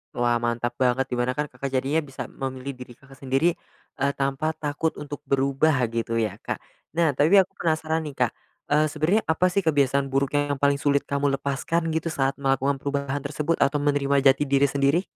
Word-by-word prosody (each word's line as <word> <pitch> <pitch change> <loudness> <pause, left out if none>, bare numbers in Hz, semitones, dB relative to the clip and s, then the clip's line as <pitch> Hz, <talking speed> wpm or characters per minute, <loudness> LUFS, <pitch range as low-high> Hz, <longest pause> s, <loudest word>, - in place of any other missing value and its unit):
Wah 120 0 +2
mantap 120 0 -1
banget, 130 0 +2
di - - 0
mana 125 +1 0
kan 150 - 0
Kakak 140 - -5
jadinya 135 +5 +1
bisa 135 -4 -6
memilih 130 0 -5
diri 125 -2 -11
Kakak 135 +2 -18
sendiri, 135 +6 +2 0.5
eee, 140 +1 +2
tanpa 140 +3 -1
takut 150 +2 -2
untuk 145 -1 -7
berubah 140 +3 +2 0.2
gitu 115 0 -2
ya, 110 -3 -1
Kak? - - -3 0.4
Nah 165 -3 +3
tapi 150 +8 +3
aku 190 -2 +5
penasaran 160 -1 0
nih 145 - -8
Kak, 120 - 0 0.4
eee, 150 +1 +4
sebenernya 155 +8 +1
apa 160 +3 +2
sih 200 - +2
kebiasaan 140 -5 +2
buruk 135 0 0
yang 145 -1 0
paling 140 +1 +2
sulit 140 -1 +2
kamu 140 0 0
lepaskan 150 +5 -1
gitu 160 +1 -1
saat 135 -4 -1
melakukan 135 0 +1
perubahan 140 0 -2
tersebut 150 +3 -2
atau 140 +2 +2
menerima 140 -1 +1
jati 145 +2 -2
diri 140 +1 +3
sendiri? 140 +6 +2
140 Hz, 190 wpm, -25 LUFS, 135-150 Hz, 0.5 s, aku